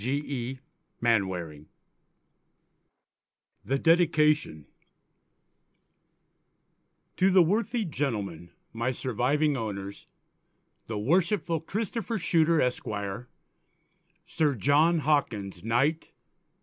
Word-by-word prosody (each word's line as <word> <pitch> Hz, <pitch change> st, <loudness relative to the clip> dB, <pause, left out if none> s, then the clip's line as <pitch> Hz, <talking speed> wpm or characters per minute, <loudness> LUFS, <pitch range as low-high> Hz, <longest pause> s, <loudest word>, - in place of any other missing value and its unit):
G. 140 Hz, +4 st, -1 dB
E. 130 Hz, -1 st, -4 dB, 0.4 s
MANWARING. 90 Hz, -10 st, -1 dB, 2.0 s
THE 135 Hz, -, 0 dB
DEDICATION 155 Hz, -, +2 dB, 2.5 s
To 190 Hz, -, +4 dB
the 185 Hz, -2 st, +6 dB
Worthy 220 Hz, +5 st, 0 dB
Gentlemen 105 Hz, -, -3 dB, 0.2 s
my 115 Hz, +2 st, -1 dB
surviving 130 Hz, +5 st, 0 dB
Owners, 100 Hz, -4 st, -6 dB, 0.8 s
the 110 Hz, -, -4 dB
Worshipful 170 Hz, -, +1 dB
Christopher 220 Hz, +7 st, -3 dB
Shuter 165 Hz, -3 st, +2 dB
Esq., 125 Hz, -2 st, 0 dB, 1.4 s
Sir 155 Hz, -5 st, 0 dB
John 150 Hz, -, +3 dB
Hawkins 115 Hz, -, -1 dB
_Kt. 135 Hz, +9 st, +1 dB
140 Hz, 75 wpm, -27 LUFS, 115-165 Hz, 2.5 s, the